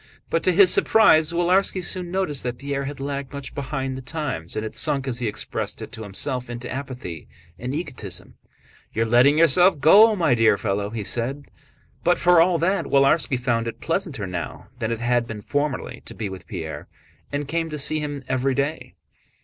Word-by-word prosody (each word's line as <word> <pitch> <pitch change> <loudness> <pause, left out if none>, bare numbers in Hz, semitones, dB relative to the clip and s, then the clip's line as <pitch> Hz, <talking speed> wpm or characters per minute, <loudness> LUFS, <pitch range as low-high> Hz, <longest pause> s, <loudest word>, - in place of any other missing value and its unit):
But 165 - +1
to 185 - +4
his 185 +1 +6
surprise 160 -8 +5
Willarski 180 +2 +2
soon 180 -1 -2
noticed 175 -6 -1
that 120 -1 -4
Pierre 140 0 -3
had 140 -1 -6
lagged 140 -1 -4
much 140 -1 -7
behind 135 -1 -3
the 130 - -6
times, 135 - -4
and 110 - -2
had 110 - -6
sunk, 140 -3 +2
as 125 -2 -2
he 120 - -1
expressed 105 - -4
it - - -8
to 110 - -8
himself, 120 +5 -3
into 120 +1 -6
apathy 130 - -6 0.3
and 125 +4 -4
egotism. 120 - -5 0.6
"You 110 - +1
are - - -1
letting 120 +6 +4
yourself 165 +2 +5
go, 210 +10 +7
my 170 -9 +2
dear 115 -3 +4
fellow," 100 -1 -2
he 110 -1 -4
said. 130 +7 -3 0.6
But 175 +1 +3
for 175 -1 +5
all 175 0 +3
that 185 +5 0
Willarski 140 0 +3
found 115 -2 0
it 115 - -6
pleasanter 165 - -2
now 90 -3 -6
than 115 -2 -2
it 115 0 -3
had 120 0 +1
been 105 -2 -7
formerly 145 -2 -2
to - - -8
be 105 -3 -4
with 95 -2 -10
Pierre, 80 -1 -6 0.4
and 145 0 -3
came 165 +2 -2
to 150 - -5
see 155 +2 +1
him 145 -2 -5
every 130 +1 0
day. 140 +4 -3
140 Hz, 195 wpm, -23 LUFS, 120-160 Hz, 0.6 s, go